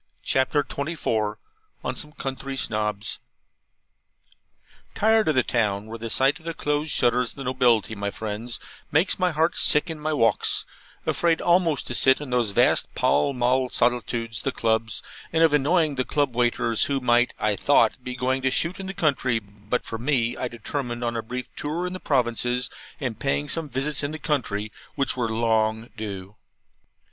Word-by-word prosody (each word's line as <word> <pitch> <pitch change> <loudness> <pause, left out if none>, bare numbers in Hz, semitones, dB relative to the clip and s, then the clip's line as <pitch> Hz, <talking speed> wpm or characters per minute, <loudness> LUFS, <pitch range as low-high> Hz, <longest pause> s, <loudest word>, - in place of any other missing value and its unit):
CHAPTER 135 +2 +2
XXIV 140 -9 -2 0.5
ON - - -2
SOME 150 -1 -7
COUNTRY 135 0 -5
SNOBS 105 -3 -2 1.8
Tired 220 -1 +3
of 155 - +2
the 130 - +4
town, 105 -4 0
where 115 +1 -8
the 115 0 -5
sight 135 +7 +3
of 165 - -19
the 165 -1 -4
closed 150 +2 -1
shutters 125 -2 +2
of - - -11
the 140 - -6
nobility, 125 -4 +2
my 100 -1 -3
friends, 110 +3 -5 0.3
makes 165 +6 +3
my 180 0 +3
heart 160 +1 +1
sick 150 +3 +3
in 160 - -6
my 155 +1 -2
walks; 115 -8 +2 0.4
afraid 170 -1 +2
almost 170 -5 +2
to - - -4
sit 130 +2 +4
in 145 -3 -7
those 120 -3 +2
vast 100 - +3
Pall 75 - +2
Mall 125 +1 +1
solitudes, 120 -2 0
the 135 - -1
Clubs, 110 -2 -1 0.3
and 165 0 +3
of 160 -2 +5
annoying 155 +2 +3
the 130 -1 0
Club 145 -3 0
waiters, 120 -2 +2
who 140 -1 0
might, 120 -1 +2
I 105 -1 +1
thought, 140 +1 +3
be 125 0 -5
going 130 +1 0
to 130 - +2
shoot 170 +8 0
in 190 - -5
the 195 - -5
country, 135 -7 +1
but 105 +2 -4
for 115 - -5
me, 120 -2 +1
I 125 - -2
determined 120 +1 -4
on 120 0 -1
a 115 - -1
brief 125 +3 -5
tour 160 +5 -3
in 180 - -4
the 185 - -5
provinces, 125 -3 0 0.3
and 125 -6 -3
paying 140 +2 0
some 165 -3 0
visits 140 +3 +1
in 145 - -1
the 155 - -5
country 115 -9 -2 0.2
which 135 - +1
were 120 -3 -1
long 110 0 +1
due. 100 -2 -7
125 Hz, 180 wpm, -25 LUFS, 115-145 Hz, 1.8 s, of